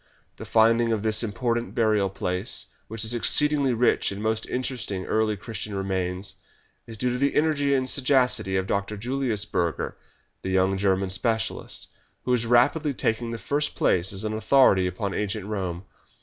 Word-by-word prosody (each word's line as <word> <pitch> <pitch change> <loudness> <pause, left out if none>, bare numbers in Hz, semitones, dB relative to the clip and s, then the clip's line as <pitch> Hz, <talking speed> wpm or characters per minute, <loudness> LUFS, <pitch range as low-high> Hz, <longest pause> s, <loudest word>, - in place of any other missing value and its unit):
The - - -8
finding 115 +1 +3
of 110 -2 -1
this 110 -1 +3
important 115 +1 -2
burial 105 -4 +2
place, 95 +3 -2 0.2
which 110 0 -4
is 110 - +2
exceeding 150 +5 +4 0.2
rich 120 -3 +2
in 100 - -6
most 110 +1 -1
interesting 120 -7 -3
early 110 -1 0
Christian 105 0 -6
remains, 95 0 -2 0.5
is 115 -1 -7
due 125 +3 0
to 125 - -3
the 140 +1 +1
energy 145 -2 +2
and 130 -1 0
sagacity 125 -7 +2
of 95 - -1
Dr. 100 +2 -2
Julius 120 -2 -2
Burger, 85 -2 -2 0.5
the 95 - -4
young 95 +1 +2
German 95 -1 0
specialist, 110 +4 -2 0.4
who 125 - 0
is 120 -2 +1
rapidly 135 +5 +3
taking 115 +1 -1
the 115 - -4
first 145 +5 -2
place 90 +1 +2
as 100 +1 -3
an 110 0 -2
authority 110 -4 +4
upon 100 +2 -3
ancient 105 -1 -3
Rome. 95 -4 -4
110 Hz, 165 wpm, -25 LUFS, 95-125 Hz, 0.5 s, exceeding